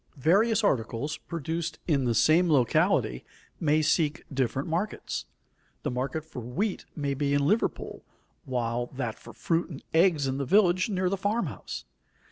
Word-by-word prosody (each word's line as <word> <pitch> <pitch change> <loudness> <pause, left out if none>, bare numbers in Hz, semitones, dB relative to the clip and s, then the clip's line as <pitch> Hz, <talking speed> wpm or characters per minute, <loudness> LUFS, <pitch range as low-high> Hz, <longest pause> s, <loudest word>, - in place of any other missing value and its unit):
Various 205 - +3
articles 130 - 0
produced 165 0 -4
in 140 -6 +2
the 120 -2 +1
same 170 +7 +4
locality 120 - +2 0.4
may 155 0 +2
seek 155 -1 +1
different 135 0 -1
markets. 170 - -3 0.6
The - - -1
market 135 +5 -3
for 160 - -8
wheat 170 - -2
may 145 -2 -1
be 140 +1 0
in 140 0 +2
Liverpool, 215 +9 0 0.4
while 120 -3 -1
that 120 -4 -3
for - - -11
fruit 165 +1 -1
and 145 -5 -9
eggs 165 -3 +4
is - - 0
in 130 - -2
the 140 - -1
village 185 - +4
near 185 -2 0
the 195 +2 0
farm 205 +5 0
house. - - -7
155 Hz, 160 wpm, -28 LUFS, 130-180 Hz, 0.6 s, same